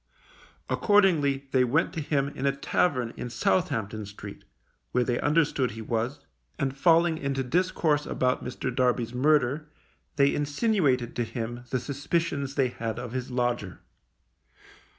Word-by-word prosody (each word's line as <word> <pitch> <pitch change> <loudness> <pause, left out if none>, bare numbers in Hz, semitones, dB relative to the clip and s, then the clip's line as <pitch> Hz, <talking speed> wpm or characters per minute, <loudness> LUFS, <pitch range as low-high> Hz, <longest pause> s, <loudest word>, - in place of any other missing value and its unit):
Accordingly 155 -10 +3
they 130 -1 +4
went 140 +10 +1
to 165 - -3
him 140 -1 0
in 140 -1 -3
a 140 - +1
tavern 130 -4 0
in 125 - -5
Southampton 110 -1 -1
Street, 100 0 -10 0.5
where 125 - +3
they 120 0 -1
understood 145 -4 +2
he 115 +2 -8
was, 115 +5 -2 0.4
and 135 -3 -1
falling 165 +1 +4
into 135 -1 -1
discourse 155 0 +1
about 125 0 0
Mr. 125 0 -4
Darby's 125 -2 +1
murder, 145 +2 +2 0.5
they 140 -1 +4
insinuated 145 - +1
to 120 - +1
him 120 +1 -5
the 130 - 0
suspicions 140 +1 -2
they 135 -3 +2
had 115 -2 -4
of 120 -1 -6
his 130 0 -4
lodger. 120 -6 -2
135 Hz, 140 wpm, -27 LUFS, 120-150 Hz, 0.5 s, they